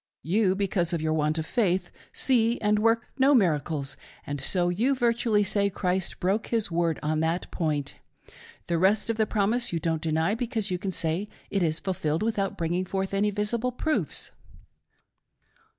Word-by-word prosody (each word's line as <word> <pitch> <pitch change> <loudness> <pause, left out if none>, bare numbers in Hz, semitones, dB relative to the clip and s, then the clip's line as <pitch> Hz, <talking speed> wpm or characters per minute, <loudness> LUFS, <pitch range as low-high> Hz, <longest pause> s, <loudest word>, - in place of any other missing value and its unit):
You, 190 +2 +2
because 185 -3 0
of 165 - -1
your 155 0 +1
want 155 0 +1
of 160 - -2
faith, 185 -6 0 0.2
see 235 -3 +2
and 210 0 +2
work 225 +1 +2
no 275 +2 +5
miracles, 150 - +1 0.3
and 145 -1 -4
so 175 +4 +2
you 235 +10 +1
virtually 235 -4 +2
say 200 0 +1
Christ 185 -1 -2
broke 195 +4 0
His 225 -6 -1
word 165 -2 0
on 155 +1 0
that 165 +3 -1
point. 150 -4 -2 0.7
The 170 -1 0
rest 200 +5 +3
of 225 - -5
the 220 -1 +2
promise 220 +4 +1
you 170 - -1
don't 160 -1 -1
deny, 160 +4 +1
because 225 -3 -2
you 180 - -1
can 195 - -3
say 175 +3 -1 0.2
it 195 - 0
is 155 -2 +2
ful 190 - -2
filled 160 -1 -1
without 205 -4 -1
bringing 170 +2 -1
forth 190 +1 -3
any 200 +1 +2
visible 220 +4 -1
proofs. 305 +5 -2
190 Hz, 175 wpm, -27 LUFS, 165-220 Hz, 0.7 s, no